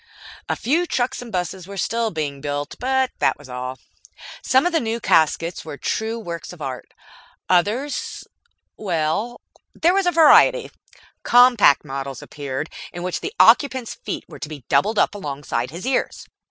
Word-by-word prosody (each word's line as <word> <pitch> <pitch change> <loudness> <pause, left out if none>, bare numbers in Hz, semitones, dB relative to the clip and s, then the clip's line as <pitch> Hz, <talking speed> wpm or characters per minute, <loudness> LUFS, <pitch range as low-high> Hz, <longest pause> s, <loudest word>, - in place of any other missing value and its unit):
A - - +1
few 330 +8 0
trucks 255 -2 -1
and 240 -2 -9
buses 180 -1 -3
were 200 0 -8
still 230 +5 0
being 145 -6 -4
built, 145 0 -3
but 260 +1 +1
that - - +2
was 145 - -14
all. 125 +1 -5 0.6
Some 260 +3 +3
of 355 - +2
the 330 - +2
new 230 -2 -2
caskets 165 -2 +1
were 150 -3 -8
true 220 - -2
works 170 -7 -6
of 180 - -12
art. 130 -4 -6 0.6
Others 210 +11 0 0.5
well, 190 +5 -2 0.3
there 345 +2 +3
was 390 -1 +1
variety. 350 +9 +5 0.5
Compact 245 - +5
models 135 -1 -6
appeared, 145 +1 -5 0.2
in 175 0 -7
which 180 0 -2
the 410 +4 -5
occupant's 260 -5 +4
feet - - -6
were - - -12
to 150 - -6
be 150 -4 -9
doubled 205 - +2
up - - +3
alongside 140 -9 -4
his 170 - -8
ears. 260 0 -1
190 Hz, 160 wpm, -21 LUFS, -, 0.6 s, variety